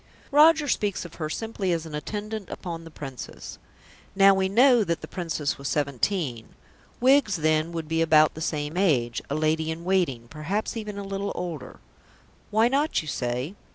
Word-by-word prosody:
Roger 305 +1 +6
speaks 205 -7 -1
of 170 - -10
her 155 - -1
simply 210 0 -2
as 165 -1 -1
an 160 - -9
attendant 210 +6 -5
upon 165 -2 -6
the - - -9
Princess. 135 -5 -8 0.6
Now 195 0 +7
we 190 0 +1
know 240 +2 +5
that 170 -4 -2
the - - -7
Princess 160 -6 -3
was 140 - -4
seventeen; 140 - -1 0.4
Wiggs 260 -5 +4
then 155 0 +1
would 165 -2 -4
be 165 +1 0
about 155 -1 +5
the 160 - -8
same 150 0 -2
age 130 -11 +1
a 140 - -1
lady 155 +1 +1
in 160 +1 -4
waiting 170 -11 0
perhaps 165 - -3
even 210 -2 -5
a 200 - -4
little 195 0 -3
older. 165 -8 -6 0.7
Why 220 +2 +4
not? 280 - +1
you - - -10
say. 125 +4 -2
170 Hz, 175 wpm, -26 LUFS, 155-205 Hz, 0.7 s, Now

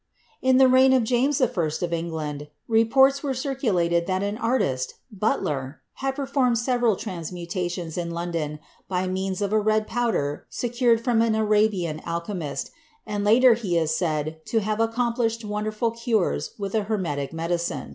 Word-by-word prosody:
In 260 0 +4
the 265 0 +7
reign 260 +1 +6
of 255 -2 +4
James 255 +5 +1
I. 255 - +5
of 170 -6 -2
England 155 -3 -4 0.2
reports 265 +5 +4
were 280 -3 -1
circu 265 -2 -1
lated 170 -1 +1
that 185 +1 0
an 205 +1 -2
artist, 205 - -1 0.2
Butler, 155 - -2 0.2
had 270 0 -2
performed 265 -3 +1
several 240 -2 +2
trans 180 -6 -6
mutations 175 -1 -4
in 170 -1 -3
London 170 -3 -3 0.3
by 185 0 -1
means 190 +1 -2
of 200 +1 -1
a 215 - +4
red 215 0 +1
powder 220 -12 -1
secured 240 -1 +1
from 235 -2 +2
an 225 -1 +2
Arabian 210 -7 +1
alchemist, 170 -3 -4 0.3
and 205 -1 -3
later 235 +4 +6
he 205 -7 -1
is 160 -1 +1
said 160 -1 -2
to 225 - +1
have 215 +1 -2
accomplished 230 0 0
wonderful 215 +2 -1
cures 220 - -1
with 200 -1 -4
a 215 -2 +1
Hermetic 170 -10 -2
medicine. 170 +1 -2
210 Hz, 160 wpm, -24 LUFS, 170-235 Hz, 0.3 s, the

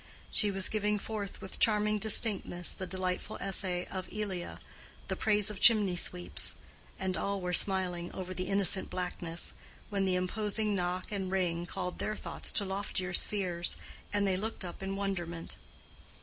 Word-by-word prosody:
She 210 - +3
was 195 -1 0
giving 210 -1 +1
forth 205 -1 -5
with 190 - -6
charming 210 -1 +3
distinctness 200 -4 +4
the 185 - -5
delightful 185 0 -2
Essay 185 -2 -1
of 185 -1 -6
Elia, 195 -4 -3 0.5
"The - - 0
Praise 210 -1 +3
of 200 - -7
Chimney 205 -5 +6
Sweeps," 175 0 0 0.4
and 190 -1 -1
all 200 +1 -1
were 180 -1 -2
smiling 180 -2 +1
over 185 -1 -5
the 185 0 -3
"innocent 195 -1 +4
blackness," 175 -2 -2 0.4
when 200 -1 +1
the 185 -1 +2
imposing 210 +3 0
knock 180 0 -2
and 190 -2 -2
ring 175 -2 0
called 180 0 -4
their 215 - -1
thoughts - - -5
to 200 - +2
loftier 190 -2 -3
spheres, 180 -3 0 0.3
and 205 -1 +2
they 190 -1 +2
looked 215 -1 -4
up 175 - -7
in 195 0 -2
wonderment. 175 -4 -3
190 Hz, 160 wpm, -32 LUFS, 180-205 Hz, 0.5 s, Chimney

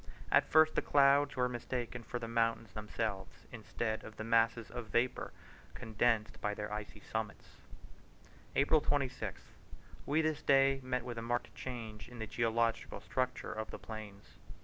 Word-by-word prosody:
At - - +5
first 155 0 +6
the - - +2
clouds 140 0 +4
were 125 -1 +2
mistaken 125 0 -4
for 120 - -4
the 115 -1 -5
mountains 115 -1 +1
themselves, 105 -2 -4
instead 110 -1 -3
of 110 - -10
the - - -4
masses 115 0 +2
of 120 -2 -5
vapour 120 +4 0 0.4
condensed 110 0 0
by 105 0 0
their 105 0 -4
icy 105 0 -6
summits. 110 -1 -5 1.0
April 145 +2 +4
26th. 135 -3 -2 0.6
We 155 +3 +3
this 155 -1 0
day 135 0 +5
met 125 -1 -1
with 120 -2 -4
a - - -4
marked 120 +1 -2
change 115 -4 -7
in 125 - -10
the 110 - -3
geological 115 0 0
structure 125 -1 -2
of 110 0 -4
the - - -6
plains. 110 -3 -10
115 Hz, 155 wpm, -34 LUFS, 110-130 Hz, 1.0 s, first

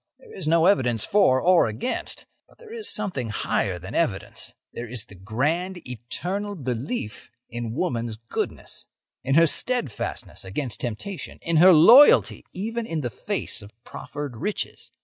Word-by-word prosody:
There 470 -3 -16
is - - -4
no 165 +1 +4
evidence 120 - +3
for 190 -11 +4
or 180 0 +4
against. 110 - -3 0.2
But - - -23
there 455 -2 -13
is 450 -2 +1
something 180 - -1
higher 100 -3 -1
than 95 +6 -9
evidence; 115 -13 -2 0.2
there 120 - -6
is 115 -1 -2
the 115 - -14
grand, 150 - -2
eternal 180 - -4
belief 125 - -4 0.2
in 120 -1 -4
woman's 120 -9 -2
goodness, 115 +1 -5 0.4
in 135 +2 +1
her 165 +1 +7
steadfastness 240 - -2
against 115 +6 -3
temptation, 130 - -5
in 170 -1 +1
her 180 +4 +8
loyalty 225 - +7
even 225 +4 -4
in 160 -2 -2
the 120 -4 -3
face - - -3
of 100 - -11
proffered 145 -2 -7
riches. 205 - -4
145 Hz, 150 wpm, -24 LUFS, 115-190 Hz, 0.4 s, her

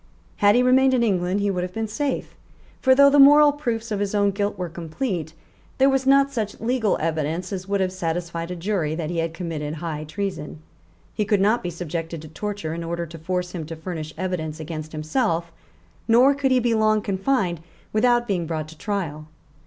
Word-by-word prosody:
Had 205 +1 +5
he 250 - +4
remained 260 +1 +4
in 240 - +2
England 190 -2 +1
he 200 0 +1
would 180 -2 -2
have 180 0 -5
been 225 0 -2
safe; 270 +6 -3 0.5
for, 260 -1 +5
though 280 +1 +7
the 290 - +5
moral 290 +1 +8
proofs 235 -6 -3
of 205 - -1
his 205 0 -1 0.2
guilt 205 0 -2
were 180 -1 -3
complete, 165 - -4 0.4
there 270 +1 +5
was 265 0 0
not 275 0 +4
such 215 -4 -3
legal 230 -2 +1
evidence 160 +4 -2
as 185 0 -5
would 200 0 0
have 185 -1 0
satisfied 170 -1 -3
a 180 - -4
jury 170 -4 -1
that 160 -1 -3
he 170 - -1
had 165 0 -1
committed 160 -3 -4
high 155 -1 -4
treason; 155 -2 -5 0.5
he 210 - 0
could 205 -1 +2
not 215 +5 +3
be 175 - -3
subjected 165 -1 -5
to - - -9
torture 200 0 -4
in 170 0 -4
order 170 +1 -3
to 165 0 -11
force 180 +2 -2
him 170 -3 -5
to 165 - -6
furnish 160 -1 -6
evidence 165 -4 -3
against 155 -1 -6
himself; 165 +2 -1 0.6
nor 245 +5 +6
could 280 -1 0
he 255 -1 +4
be 240 -1 +1
long 215 -1 +3
confined 195 - 0 0.3
without 240 +2 +3
being 180 -5 -1
brought 155 -2 -3
to 160 - -13
trial. 160 -7 -3
185 Hz, 200 wpm, -23 LUFS, 165-225 Hz, 0.6 s, moral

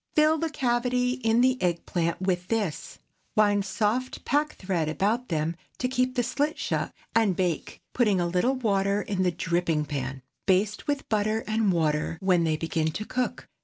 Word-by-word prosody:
Fill 310 0 +4
the 330 - -1
cavity 250 -3 +1
in 230 -2 +2
the 255 0 +3
egg 170 -2 0
plant 170 -1 -1
with 180 -1 -1
this; 210 -8 -2 0.4
wind 205 -2 +4
soft 215 +6 -1
pack 295 +3 +1
thread 180 -5 -1
about 215 +10 0
them 160 0 -1 0.2
to 250 - 0
keep 255 0 0
the 245 - +2
slit 290 +6 -1
shut, - - -1 0.2
and 220 -5 +3
bake, 180 -3 -2
putting 210 -6 +3
a 175 - +1
little 180 +10 +1
water 200 -4 +1
in 195 -2 -2
the 185 - +3
dripping 170 -3 0
pan. 135 -2 -4 0.2
Baste 200 +2 +1
with 285 -1 -1
butter 215 +1 0
and 215 -2 +1
water 155 -2 0
when 180 -3 +3
they 155 -1 +1
begin 160 0 -1
to 215 - -4
cook. 250 +2 -2
205 Hz, 175 wpm, -27 LUFS, 175-250 Hz, 0.4 s, Fill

